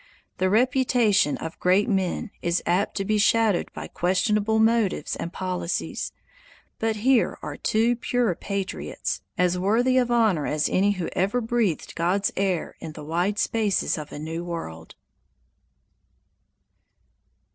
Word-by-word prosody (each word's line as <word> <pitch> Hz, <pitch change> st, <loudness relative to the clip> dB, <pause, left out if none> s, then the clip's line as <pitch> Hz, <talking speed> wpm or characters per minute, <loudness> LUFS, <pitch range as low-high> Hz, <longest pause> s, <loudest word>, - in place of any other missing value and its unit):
The 185 Hz, 0 st, +2 dB
reputation 235 Hz, -, +3 dB
of 160 Hz, 0 st, -7 dB
great 190 Hz, +4 st, +3 dB
men 195 Hz, -1 st, -1 dB
is 170 Hz, 0 st, 0 dB
apt 185 Hz, +5 st, 0 dB
to 195 Hz, -, -1 dB
be 215 Hz, +1 st, +1 dB
shadowed 215 Hz, -2 st, +2 dB
by -, -, -7 dB
questionable 210 Hz, +4 st, +1 dB
motives 220 Hz, -7 st, +2 dB
and 170 Hz, -, -5 dB
policies, 180 Hz, -2 st, -3 dB, 0.7 s
but 225 Hz, 0 st, 0 dB
here 240 Hz, +3 st, +2 dB
are -, -, -5 dB
two 230 Hz, +3 st, +1 dB
pure 240 Hz, -4 st, 0 dB
patriots, 195 Hz, +2 st, -4 dB, 0.2 s
as 180 Hz, 0 st, +2 dB
worthy 240 Hz, +7 st, +3 dB
of 245 Hz, -1 st, +1 dB
honor 220 Hz, -10 st, +2 dB
as 150 Hz, 0 st, +1 dB
any 200 Hz, +2 st, +2 dB
who 180 Hz, -4 st, -4 dB
ever 200 Hz, +7 st, +1 dB
breathed 225 Hz, -7 st, -1 dB
God's 180 Hz, +4 st, 0 dB
air 190 Hz, -4 st, -1 dB
in 160 Hz, -2 st, -7 dB
the -, -, -9 dB
wide 175 Hz, +6 st, 0 dB
spaces 215 Hz, -3 st, +1 dB
of 150 Hz, -2 st, -7 dB
a -, -, -7 dB
new 160 Hz, +3 st, -5 dB
world. 80 Hz, -, -7 dB
195 Hz, 135 wpm, -25 LUFS, 175-225 Hz, 0.7 s, reputation